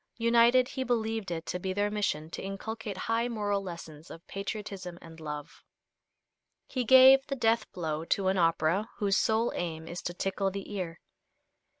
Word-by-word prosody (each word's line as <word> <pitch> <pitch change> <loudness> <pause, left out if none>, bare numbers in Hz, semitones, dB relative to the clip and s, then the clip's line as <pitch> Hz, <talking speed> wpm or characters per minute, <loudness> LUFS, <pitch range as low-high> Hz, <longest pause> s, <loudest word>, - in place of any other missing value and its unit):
United, 235 +2 +4
he 265 -2 -3
believed 225 -4 -1
it 165 -2 -4
to 180 - -3
be 185 +1 -2
their 205 +1 0
mission 195 -7 -1
to 165 - -7
inculcate 200 +1 -5
high 230 +4 0
moral 205 -4 -1
lessons 170 -4 -9
of 165 - -11
patriotism 195 -3 -6
and 165 -1 -13
love. 150 -2 -7 1.0
He 255 - -2
gave 260 +3 +8
the 275 - -2
death 225 -2 +1
blow 160 -3 -3
to 190 +2 +1
an 190 - +1
opera 165 +4 +2
whose 200 -2 +1
sole 225 +2 +2
aim 160 -2 -4
is 175 +1 -6
to 175 - -4
tickle 195 +1 -1
the 200 +2 -7
ear. 175 -4 -4
195 Hz, 170 wpm, -29 LUFS, 170-225 Hz, 1.0 s, gave